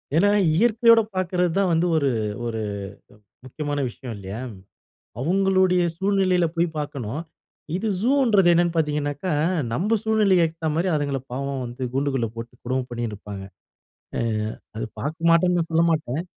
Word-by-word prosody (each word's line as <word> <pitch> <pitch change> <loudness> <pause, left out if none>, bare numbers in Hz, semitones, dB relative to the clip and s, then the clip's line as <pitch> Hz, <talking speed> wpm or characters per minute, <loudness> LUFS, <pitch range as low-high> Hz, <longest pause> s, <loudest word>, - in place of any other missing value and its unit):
ஏனா 195 +5 +4 0.3
இயற்கையோட 230 +3 +5
பாக்குறது 180 -1 0
தான் 195 -2 +2
வந்து, 165 +2 +2
ஒரு 140 -3 +2 0.4
ஒரு 115 -1 -3 0.8
முக்கியமான 145 +2 -4
விஷயம் 120 0 -8
இல்லையா? 100 +3 -7 0.8
அவங்களுடைய 185 +3 +3 0.2
சூழ்நிலையில 190 -2 +2
போய் 170 +1 +3
பாக்கணும். 140 -1 -4 0.5
இது 220 +4 -2
ஜூன்றது 235 -7 +4
என்னனு 175 0 +2
பார்த்தீங்கனா, 150 +2 -1 0.4
நம்ம 210 - +1
சூழ்நிலைக்கு 210 -5 +4
ஏத்த 160 0 -3
மாரி 175 +3 +1
அதுங்கள 145 -2 -1
பாவம் 135 0 -3
வந்து 120 +2 -7
கூண்டுக்குள்ள 135 -4 0
போட்டு 115 +1 -7
கொடும 130 +1 -1
பண்ணிட்டு 120 -2 -3
இருப்பாங்க. 100 -1 -8 0.7
அ, - - +1 0.6
அது 110 - -3
பாக்கமாட்டேனு 165 +4 +2
நான் 165 -1 -2
சொல்லமாட்டேன். 160 -3 +1
165 Hz, 130 wpm, -23 LUFS, 135-185 Hz, 0.8 s, இயற்கையோட